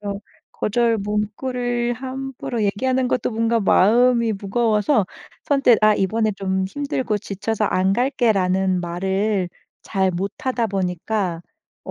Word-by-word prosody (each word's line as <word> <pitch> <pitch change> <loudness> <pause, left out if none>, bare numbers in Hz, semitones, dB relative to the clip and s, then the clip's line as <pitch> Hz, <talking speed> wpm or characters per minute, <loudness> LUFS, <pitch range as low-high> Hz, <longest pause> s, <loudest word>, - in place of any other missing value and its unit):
그래서 200 -1 -4 0.3
거절 230 +1 +1
문구를 240 +4 -2
함부로 260 -2 -5
얘기하는 255 +5 0
것도 250 - 0
뭔가 230 +1 +1
마음이 235 +4 +4
무거워서 210 +2 +1 0.4
선뜻 275 -5 +4
"아 215 0 +6
이번에 215 +3 0
좀 190 -1 -1
힘들고 260 -2 -2
지쳐서 210 +2 -3
안 190 +1 +1
갈게."라는 190 -8 +1
말을 190 +2 -1 0.3
잘 190 -2 0
못하다 225 +7 -2
보니까 185 -1 -2 0.4
어 - - -6
215 Hz, 270 characters per minute, -21 LUFS, 195-240 Hz, 0.4 s, 아